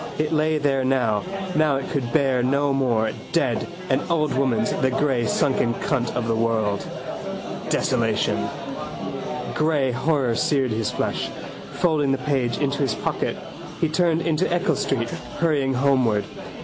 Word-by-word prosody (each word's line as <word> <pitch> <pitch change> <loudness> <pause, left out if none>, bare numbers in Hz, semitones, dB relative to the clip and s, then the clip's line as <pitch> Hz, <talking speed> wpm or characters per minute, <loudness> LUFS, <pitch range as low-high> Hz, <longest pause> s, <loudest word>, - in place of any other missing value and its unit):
It 155 0 0
lay 155 0 +2
there 140 -2 +1
now. 125 -5 +2 0.3
Now 155 -2 +3
it 135 - -3
could 125 -5 -1
bear 135 -4 +3
no 140 +3 +2
more. 115 -5 +1 0.2
Dead: 135 -9 +1 0.2
an - - +2
old 155 -3 +1
woman's: 140 +11 +1
the 160 -10 +1
grey 130 -3 +1
sunken 120 -2 +1
cunt 125 -5 0
of 120 -2 -1
the 115 - +2
world. 110 -3 0 0.8
Desolation. - - +1 1.1
Grey 150 -4 +2
horror 130 -1 +1
seared 130 +1 +1
his 110 0 0
flesh. - - -2 0.4
Folding 155 -5 +2
the - - +1
page 130 -3 0
into 140 -1 0
his 135 -7 +1
pocket - - -2 0.4
he 165 - +1
turned 165 0 +2
into 160 -1 +1
Eccles 175 +3 +1
street, 115 -3 -1 0.3
hurrying 145 -5 +1
homeward. 125 -6 +3
135 Hz, 145 wpm, -23 LUFS, 120-150 Hz, 1.1 s, Now